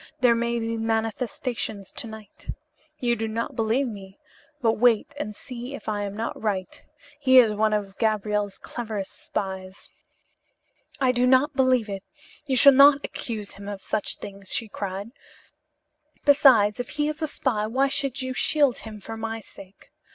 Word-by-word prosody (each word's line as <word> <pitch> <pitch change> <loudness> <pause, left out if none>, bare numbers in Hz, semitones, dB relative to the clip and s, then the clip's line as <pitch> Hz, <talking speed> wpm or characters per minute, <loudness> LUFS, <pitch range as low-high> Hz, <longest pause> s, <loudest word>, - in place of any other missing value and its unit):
There 245 -2 +6
may 235 0 0
be 230 0 -2
manifestations 225 -1 -2
to - - -4
night. 220 -1 -12 0.5
You 240 -2 +1
do 225 0 -3
not 225 +2 -3
believe 230 +4 +1
me, 195 -3 -9 0.4
but 225 -5 +1
wait 240 +3 +3
and 210 -8 -4
see 250 +3 -7
if - - -12
I 210 -1 -1
am 200 +1 -6
not 225 - -4
right. 195 -4 -3 0.4
He 260 -2 +5
is 230 -4 +7
one 215 +1 +1
of 200 -2 -2
Gabriel's 210 -2 0
cleverest 215 -5 -6
spies." 190 -1 -5 1.1
"I 260 -2 +3
do 250 0 +2
not 265 +3 +4
believe 255 -4 +3
it. 195 -1 -5 0.5
You 265 - +1
shall 280 +2 +9
not 280 +1 +7
accuse 215 -4 -5
him 200 0 -10
of 200 -2 -6
such 215 - 0
things," 195 -1 -9
she 225 - 0
cried. 200 +1 -5 1.1
"Besides, 255 -7 +5
if 245 - -4
he 295 0 +1
is 305 +1 -4
a 315 - 0
spy 220 -7 -1
why 265 +5 +2
should 275 -1 -1
you 260 0 -3
shield 280 0 +2
him 215 -1 -9
for 225 +3 -7
my 225 0 -4
sake? 195 -2 -14
225 Hz, 165 wpm, -25 LUFS, 210-255 Hz, 1.1 s, shall